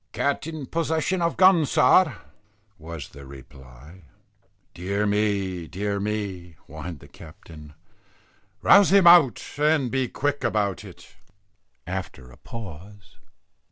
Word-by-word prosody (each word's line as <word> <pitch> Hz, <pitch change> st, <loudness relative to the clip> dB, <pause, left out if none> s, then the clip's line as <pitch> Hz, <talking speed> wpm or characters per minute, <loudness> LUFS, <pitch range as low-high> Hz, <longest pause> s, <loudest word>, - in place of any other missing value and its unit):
"Cat 140 Hz, +2 st, -1 dB
in 160 Hz, -4 st, -6 dB
possession 165 Hz, +4 st, -2 dB
of 170 Hz, 0 st, -1 dB
gun, 185 Hz, -3 st, +5 dB
sir," 150 Hz, +4 st, +3 dB, 0.6 s
was 80 Hz, -2 st, -9 dB
the 70 Hz, +1 st, -13 dB
reply. 65 Hz, +4 st, -15 dB, 0.7 s
"Dear 100 Hz, +4 st, -2 dB
me! 100 Hz, -4 st, -1 dB
dear 100 Hz, +3 st, -3 dB
me!" 100 Hz, -4 st, -5 dB
whined 80 Hz, +1 st, -9 dB
the -, -, -14 dB
captain. 75 Hz, -2 st, -14 dB, 0.9 s
"Rouse 200 Hz, -1 st, +6 dB
him 195 Hz, -2 st, +5 dB
out, 170 Hz, -7 st, +6 dB
and 150 Hz, -4 st, +1 dB
be 130 Hz, -1 st, -1 dB
quick 145 Hz, +1 st, -3 dB
about 105 Hz, -5 st, -1 dB
it." -, -, -15 dB, 0.7 s
After 90 Hz, -8 st, -7 dB
a -, -, -17 dB
pause. 100 Hz, -, -11 dB
100 Hz, 120 wpm, -24 LUFS, -, 0.9 s, Rouse